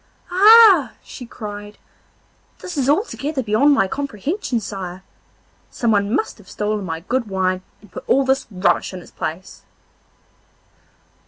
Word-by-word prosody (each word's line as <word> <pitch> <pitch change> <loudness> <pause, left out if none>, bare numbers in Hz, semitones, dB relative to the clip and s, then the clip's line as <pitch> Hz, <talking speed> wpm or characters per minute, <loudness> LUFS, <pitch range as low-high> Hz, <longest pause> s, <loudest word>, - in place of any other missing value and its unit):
'Ah!' 400 - +7
she 245 - -10
cried, 205 -2 -9 0.8
'this 360 - -8
is 275 -2 0
altogether 295 - -1
beyond 230 +7 +3
my 275 -9 +3
comprehension, 280 - -3
sire. 190 -3 -7 0.7
Someone 210 -3 0
must 305 - -2
have - - -17
stolen 210 0 -2
my 165 -3 -5
good 240 +5 -2
wine 185 -1 -1 0.2
and 205 -3 -19
put - - -8
all 270 +1 +3
this 265 +1 0
rubbish 190 -1 0
in 180 - -8
its - - -17
place. 165 +4 -6
225 Hz, 135 wpm, -20 LUFS, 195-285 Hz, 0.8 s, Ah